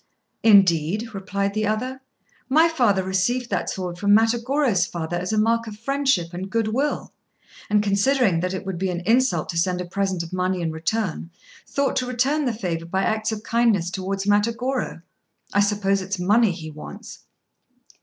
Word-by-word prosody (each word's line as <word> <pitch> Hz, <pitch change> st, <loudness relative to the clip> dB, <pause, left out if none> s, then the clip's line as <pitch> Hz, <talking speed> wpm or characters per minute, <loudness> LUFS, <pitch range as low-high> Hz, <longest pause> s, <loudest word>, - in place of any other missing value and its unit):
"Indeed," 200 Hz, +1 st, +4 dB
replied 200 Hz, 0 st, -2 dB
the 215 Hz, 0 st, 0 dB
other, 255 Hz, +5 st, -2 dB, 0.5 s
"my 315 Hz, +5 st, +5 dB
father 240 Hz, -, +2 dB
received 215 Hz, +7 st, -1 dB
that -, -, -1 dB
sword 180 Hz, -2 st, -5 dB
from 205 Hz, +1 st, +4 dB
Matagorô's 235 Hz, -2 st, +1 dB
father 170 Hz, 0 st, -4 dB
as 180 Hz, +2 st, -3 dB
a 215 Hz, -, 0 dB
mark 230 Hz, +1 st, +2 dB
of 210 Hz, -1 st, -8 dB
friendship 265 Hz, -8 st, 0 dB
and 185 Hz, +2 st, -5 dB
good 225 Hz, +1 st, 0 dB
will, 275 Hz, +7 st, -2 dB, 0.6 s
and, 210 Hz, 0 st, +3 dB
considering 200 Hz, -1 st, +2 dB
that 185 Hz, +2 st, -2 dB
it 190 Hz, -, -6 dB
would 190 Hz, -3 st, -4 dB
be 190 Hz, 0 st, 0 dB
an 175 Hz, -1 st, -3 dB
insult 250 Hz, +7 st, +2 dB
to 165 Hz, -, -1 dB
send 180 Hz, +1 st, 0 dB
a 180 Hz, -, -3 dB
present 190 Hz, -1 st, -2 dB
of 170 Hz, -, -10 dB
money 185 Hz, 0 st, 0 dB
in 165 Hz, -1 st, -1 dB
return, 165 Hz, +2 st, -2 dB, 0.4 s
thought 280 Hz, -2 st, 0 dB
to 255 Hz, -, 0 dB
return 265 Hz, +5 st, +1 dB
the 250 Hz, -, +1 dB
favour 175 Hz, -7 st, -4 dB
by 190 Hz, +3 st, -1 dB
acts 220 Hz, 0 st, 0 dB
of 215 Hz, -1 st, -5 dB
kindness 225 Hz, -7 st, +1 dB
towards 195 Hz, +1 st, -3 dB
Matagorô. 230 Hz, 0 st, 0 dB, 0.5 s
I 205 Hz, -, +3 dB
suppose 200 Hz, -1 st, +1 dB
it 185 Hz, -, -8 dB
is 195 Hz, -1 st, -2 dB
money 210 Hz, +5 st, +4 dB
he 160 Hz, -3 st, -7 dB
wants." 150 Hz, 0 st, -10 dB
200 Hz, 180 wpm, -23 LUFS, 185-230 Hz, 0.6 s, my